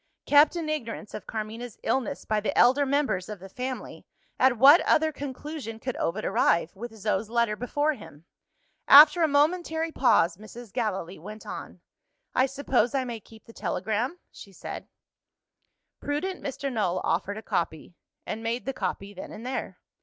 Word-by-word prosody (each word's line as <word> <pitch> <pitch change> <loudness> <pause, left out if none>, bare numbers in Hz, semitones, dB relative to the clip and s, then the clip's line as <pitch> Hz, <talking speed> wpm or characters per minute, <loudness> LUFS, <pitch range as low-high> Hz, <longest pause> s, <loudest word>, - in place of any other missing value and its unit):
Kept 290 +3 +5
in 335 -2 -3
ignorance 230 -8 -4
of 195 - -7
Carmina's 225 +2 -6
illness 265 -4 -1
by 215 -1 +1
the 210 - -2
elder 270 +4 +5
members 265 -10 0
of 210 - -5
the 190 - -10
family, 250 +5 -6 0.3
at 255 -1 +4
what 280 +8 +8
other 315 0 +3
conclusion 285 -3 -6
could 250 +2 -4
Ovid 195 +6 -2
arrive, 170 +1 +2
with 225 +3 -8
Zo's 210 0 -1
letter 235 -2 +1
before 290 +7 0
him? 155 - -13 0.6
After 300 +4 +9
a 320 - +5
momentary 320 +2 +1
pause, 175 - +3
Mrs. 215 +1 -12
Gallilee 195 -8 -3
went 210 +6 -10
on. - - -8 0.5
"I 260 - +3
suppose 265 -3 0
I 265 - +1
may 240 -3 -5
keep 220 +1 -17
the 230 - -14
telegram?" 220 - -2
she 200 - -13
said. 190 - -8 1.1
Prudent 360 +6 -3
Mr. 275 0 -4
Null 185 -5 0
offered 205 +1 -1
a 220 - -8
copy 165 -2 -3 0.3
and 220 - -4
made 230 +2 -2
the 270 - -2
copy, 200 -5 -4
then 190 - -9
and 225 - -9
there. 260 +1 -4
240 Hz, 165 wpm, -27 LUFS, 210-285 Hz, 1.1 s, After